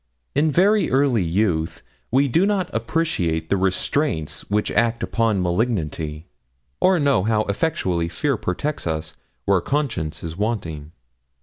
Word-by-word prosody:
In 150 Hz, +2 st, +2 dB
very 200 Hz, +6 st, +3 dB
early 130 Hz, -4 st, +3 dB
youth 85 Hz, -2 st, 0 dB, 0.3 s
we 135 Hz, +3 st, +3 dB
do 165 Hz, +8 st, +3 dB
not 195 Hz, -4 st, -1 dB
appreciate 95 Hz, -, -1 dB
the -, -, +3 dB
restraints 95 Hz, -, 0 dB
which 105 Hz, +1 st, 0 dB
act 115 Hz, 0 st, +1 dB
upon 110 Hz, -5 st, +1 dB
malignity, 85 Hz, -6 st, -1 dB, 0.5 s
or 185 Hz, 0 st, +4 dB
know 140 Hz, -8 st, +3 dB
how 110 Hz, 0 st, +2 dB
effectually 95 Hz, -, -1 dB
fear 135 Hz, -, 0 dB
protects 110 Hz, -, -3 dB
us 80 Hz, -1 st, -3 dB, 0.3 s
where 100 Hz, -2 st, +3 dB
conscience 115 Hz, -, -2 dB
is 80 Hz, -1 st, -5 dB
wanting. 85 Hz, -8 st, -3 dB
105 Hz, 130 wpm, -22 LUFS, 85-140 Hz, 0.5 s, or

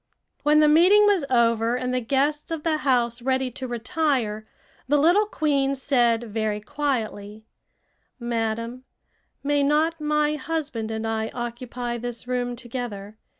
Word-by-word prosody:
When 300 Hz, +1 st, +4 dB
the 305 Hz, -, +5 dB
meeting 365 Hz, +7 st, +6 dB
was 395 Hz, -8 st, +3 dB
over 230 Hz, -1 st, +2 dB
and 250 Hz, 0 st, -2 dB
the 255 Hz, -, +1 dB
guests 280 Hz, +5 st, 0 dB
of 325 Hz, -2 st, -4 dB
the 320 Hz, -2 st, +1 dB
house 245 Hz, -4 st, +1 dB
ready 260 Hz, 0 st, 0 dB
to 260 Hz, +2 st, -6 dB
retire, 240 Hz, -4 st, -1 dB, 0.4 s
the 295 Hz, +2 st, +3 dB
little 350 Hz, +8 st, +4 dB
queen 280 Hz, -7 st, 0 dB
said 240 Hz, -4 st, +2 dB
very 215 Hz, -2 st, -2 dB
quietly: 220 Hz, -4 st, -3 dB, 0.7 s
"Madam, 230 Hz, +1 st, -3 dB, 0.6 s
may 290 Hz, 0 st, +1 dB
not 310 Hz, +3 st, +1 dB
my 300 Hz, 0 st, +1 dB
husband 280 Hz, -7 st, -3 dB
and 220 Hz, 0 st, -3 dB
I 220 Hz, 0 st, -1 dB
occupy 240 Hz, 0 st, -4 dB
this 240 Hz, 0 st, -6 dB
room 245 Hz, -1 st, -2 dB
together? 230 Hz, -4 st, -7 dB
250 Hz, 140 wpm, -24 LUFS, 230-295 Hz, 0.7 s, meeting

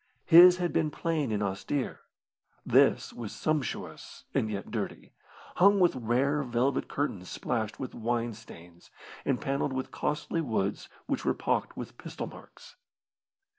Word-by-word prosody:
His 180 Hz, +1 st, +9 dB
had 175 Hz, -1 st, -1 dB
been 155 Hz, -2 st, +2 dB
plain 155 Hz, -4 st, -1 dB
and 105 Hz, -1 st, 0 dB
austere. 100 Hz, +8 st, -2 dB, 0.7 s
This -, -, +3 dB
was 115 Hz, -3 st, -6 dB
sumptuous 155 Hz, -4 st, -3 dB
and 110 Hz, -, +1 dB
yet 100 Hz, -2 st, -5 dB
dirty, -, -, -5 dB, 0.4 s
hung 200 Hz, +2 st, +6 dB
with 175 Hz, -5 st, +4 dB
rare 130 Hz, +5 st, +1 dB
velvet 125 Hz, +1 st, 0 dB
curtains 105 Hz, -11 st, -3 dB
splashed 110 Hz, -3 st, -3 dB
with 130 Hz, -, -5 dB
wine 120 Hz, 0 st, -1 dB
stains, 85 Hz, -5 st, -14 dB, 0.4 s
and 135 Hz, -, +1 dB
panelled 135 Hz, 0 st, -1 dB
with 130 Hz, 0 st, -3 dB
costly 150 Hz, +2 st, -2 dB
woods 110 Hz, -8 st, -2 dB, 0.2 s
which -, -, -2 dB
were -, -, +1 dB
pocked -, -, -1 dB
with -, -, -8 dB
pistol -, -, -6 dB
marks. -, -, -14 dB
130 Hz, 140 wpm, -29 LUFS, 110-150 Hz, 0.7 s, His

